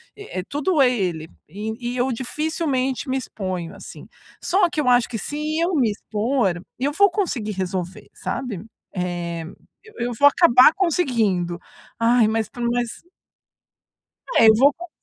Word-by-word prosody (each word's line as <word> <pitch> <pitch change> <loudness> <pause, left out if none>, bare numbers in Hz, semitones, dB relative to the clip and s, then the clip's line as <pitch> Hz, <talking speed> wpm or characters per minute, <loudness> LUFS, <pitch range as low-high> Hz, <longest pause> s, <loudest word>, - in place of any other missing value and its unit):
e 410 - -7
e, - - -3
tudo 295 - -1
é 255 - +6
ele. 175 -8 -2 0.2
E 220 +6 -5
e - - -4
eu 255 +2 +1
dificilmente 265 0 -2
me 265 - 0
exponho, 185 -8 -5
assim. - - -11 0.4
Só 365 -1 +3
que 310 - -4
eu 255 - -3
acho 245 -1 +4
que, 230 - -4
se 295 +8 -5 0.2
eu 350 +2 +1
me 245 -6 +3
expor, 210 -3 -1 0.2
eu 275 +4 0
vou 400 +4 +5
conseguir 310 - -2
resolver, 185 -1 -4
sabe. 220 -9 -4 0.4
Eh, 175 -2 -3 0.4
eu 440 - -17
eu 245 - -3
vou 285 - +7
acabar 285 -3 +6
conseguindo. 230 - 0 0.4
Ai, 230 -1 +4
mas 220 -1 0
por 245 - -9
mais 240 +3 -2 1.3
É, 225 - +7
eu 220 - +9
vou 280 +5 +5
co 350 0 -10
245 Hz, 160 wpm, -22 LUFS, 200-285 Hz, 1.3 s, eu